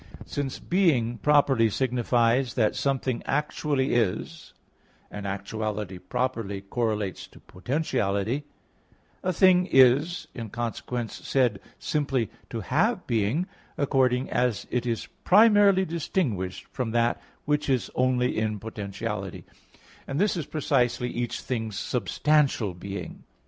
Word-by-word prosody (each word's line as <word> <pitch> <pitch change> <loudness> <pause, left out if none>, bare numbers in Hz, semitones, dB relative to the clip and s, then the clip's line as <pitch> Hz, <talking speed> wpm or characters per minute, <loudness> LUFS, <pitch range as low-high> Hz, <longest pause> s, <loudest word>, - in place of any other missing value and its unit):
Since 140 -2 -3
being 140 -11 +1
properly 140 -6 +4
signifies 120 0 +1
that 110 -4 +2
something 135 -3 -1
actually 145 -1 0
is, 115 -6 -1 0.6
and 100 -1 -5
actuality 100 -1 -4
properly 115 -2 -2
correlates 105 -1 -2
to - - -17
potentiality; 110 - -1 0.8
a 185 - 0
thing 180 0 +5
is, 135 +6 +4
in 115 -3 -6
consequence, 120 +1 -4
said 125 -7 +2 0.2
simply 135 -7 -1 0.2
to 115 - -4
have 180 - +1
being, 115 - +1 0.3
accordingly 130 -2 +1
as 125 -3 0
it 125 0 -1
is 115 -2 -1 0.2
primarily 205 -2 +6
distinguished 140 - -2
from 125 -4 -2
that 120 0 +1 0.2
which 150 0 0
is 130 -3 0
only 125 -1 +1
in 110 -1 -1
potentiality; 105 -1 -5 0.6
and 135 +2 -2
this 205 +1 +2
is 160 -5 -4
precisely 125 -5 0
each 120 0 -3
thing's 110 -5 -3
substantial 140 -9 +1
being. 95 +3 -7
125 Hz, 115 wpm, -26 LUFS, 110-145 Hz, 0.8 s, primarily